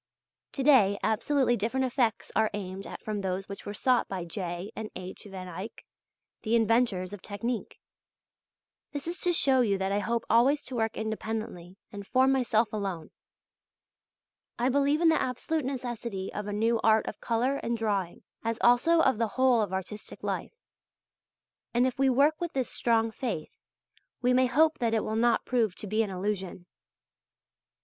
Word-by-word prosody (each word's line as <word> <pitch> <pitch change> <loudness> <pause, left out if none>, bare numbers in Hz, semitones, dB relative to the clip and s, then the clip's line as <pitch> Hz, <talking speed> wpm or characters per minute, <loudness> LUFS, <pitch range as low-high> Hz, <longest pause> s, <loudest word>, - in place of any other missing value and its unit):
To 275 - -2
day 225 -9 +5
absolutely 250 +3 +2
different 235 +5 0
effects 245 -4 0
are 220 -1 +3
aimed 195 -1 -6
at - - -9
from 210 -2 -3
those 190 0 -3
which 200 0 -8
were 205 - -4
sought 250 +2 +2
by 185 -3 -4
J. 175 +1 -5
and 220 -1 -5
H. 185 +2 -8
van 185 -1 -7
Eyck, 185 +6 -8 0.6
the 225 +1 +1
inventors 225 -5 +2
of 205 - -8
technique. 230 +3 -4 1.1
This 285 -1 -4
is 340 +2 -3
to 355 - +2
show 270 -6 +3
you 205 -5 +2
that 190 0 -1
I 200 - +1
hope 235 +2 -1
always 270 +6 +4
to 260 - -7
work 225 -1 -1
independently 220 -4 -4
and 200 -1 -8
for 260 +1 +4
myself 240 -5 +2
alone. 195 -6 -4 1.5
I 245 +2 +1
believe 285 +3 +2
in 335 - +6
the 320 - +3
absolute 265 +4 -2
necessity 240 -7 -4
of 210 0 -4
a - - -3
new 225 +3 +1
art 220 0 +4
of - - -7
colour 245 +4 0
and 235 -2 -2
drawing, 200 -6 -2 0.2
as 230 0 -1
also 320 +8 +5
of 265 -7 +2
the 230 - +2
whole 255 -3 +4
of 205 -3 -2
artistic 190 +3 -5
life. - - -3 1.2
And 245 +1 +4
if 260 0 -2
we 270 0 +4
work 285 +5 +3
with 345 -1 -3
this 260 -2 -1
strong 225 -1 +1
faith, 220 -10 -4 0.7
we 250 0 +2
may 255 0 +4
hope 315 +5 +3
that 230 -2 +1
it 220 - +1
will 220 - -2
not 235 0 +2
prove 225 -7 +1
to - - -7
be 215 +2 +1
an 215 - -1
illusion. 190 -1 -3
225 Hz, 175 wpm, -28 LUFS, 200-255 Hz, 1.5 s, in